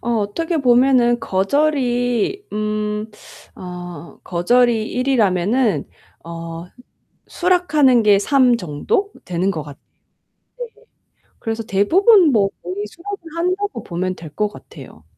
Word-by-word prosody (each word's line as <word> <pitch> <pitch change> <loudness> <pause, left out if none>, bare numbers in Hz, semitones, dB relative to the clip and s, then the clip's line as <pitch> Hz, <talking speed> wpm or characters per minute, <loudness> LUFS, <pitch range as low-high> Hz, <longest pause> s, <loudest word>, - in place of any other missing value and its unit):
어 240 - -3
어떻게 320 - -2
보면은 245 -2 +3
거절이 245 - 0
음 210 0 -2 0.5
어 175 -1 -9
거절이 225 +5 +2
1 255 +2 -2
이라면은 210 - +1 0.4
어 165 0 -7 0.6
수락하는 305 -9 +3
게 205 -1 +5
3 255 +2 +3
정도 235 - -2
되는 180 +2 -1
것 160 -5 -4
같 145 -2 -12 0.8
네 - - -4
네. - - -23 0.6
그래서 225 -1 -3
대부분 340 - +4
뭐 205 -5 +2
거의 190 +4 -4
수락을 395 - -8 0.2
한다고 360 - -2
보면 185 +1 -3
될 160 -2 -10
것 210 - +1
같아요. - - -14
225 Hz, 220 characters per minute, -19 LUFS, 190-280 Hz, 0.8 s, 게